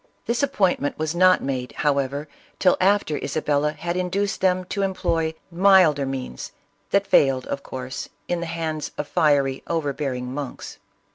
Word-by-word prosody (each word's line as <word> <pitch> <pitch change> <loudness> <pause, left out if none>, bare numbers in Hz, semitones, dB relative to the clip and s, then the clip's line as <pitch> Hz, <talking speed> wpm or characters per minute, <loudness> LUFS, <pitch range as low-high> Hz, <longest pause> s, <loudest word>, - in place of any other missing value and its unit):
This 235 +3 0
appointment 190 - +1
was 155 0 -2
not 185 +1 +4
made, 130 -2 -3
however, 140 0 0 0.3
till 185 - +4
after 190 -5 +2
Isabella 150 0 0
had 170 +2 -4
induced 185 +3 -1
them 185 -1 +2
to 200 +2 -3
employ 165 -4 0 0.2
milder 170 -6 +5
means, 130 - -5 0.4
that 200 0 +2
failed 135 -9 +3
of 140 - -4
course, 130 -1 -6 0.2
in 175 - -1
the 170 - -4
hands 160 -2 -3
of 150 - -3
fiery, 145 -5 +2
overbearing 140 -5 -2
monks. 140 -2 -6
155 Hz, 145 wpm, -23 LUFS, 140-185 Hz, 0.4 s, milder